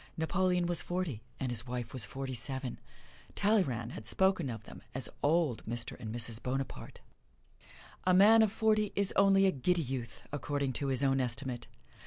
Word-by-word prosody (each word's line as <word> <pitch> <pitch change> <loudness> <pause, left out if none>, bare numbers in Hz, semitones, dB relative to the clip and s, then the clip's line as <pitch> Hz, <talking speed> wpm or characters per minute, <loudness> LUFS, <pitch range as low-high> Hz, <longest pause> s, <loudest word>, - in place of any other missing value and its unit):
Napoleon 180 +2 +1
was 175 -1 +1
forty, 175 -11 -3 0.2
and 130 -2 -2
his 120 +1 -3
wife 120 -2 -4
was 125 -5 0
forty 135 +5 -5
seven. 130 +1 -1 0.6
Talleyrand 140 - +1
had 110 - -8
spoken 185 - +1
of 110 -2 -6
them - - -12
as 130 - -1
Old 155 -5 +2
Mr. 120 +1 -4
and 110 -3 -5
Mrs. 115 -1 -1
Bonaparte. 135 +1 -4 1.0
A 185 - +4
man 215 +4 +7
of 220 -2 +3
forty 215 -1 +2
is 200 -1 +1
only 195 0 +5
a 190 - +4
giddy 170 +5 +1
youth, 120 -4 -5
according 145 -2 -2
to 140 - -2
his 135 0 +2
own 135 -1 +3
estimate. 125 0 -3
135 Hz, 170 wpm, -32 LUFS, 120-185 Hz, 1.0 s, man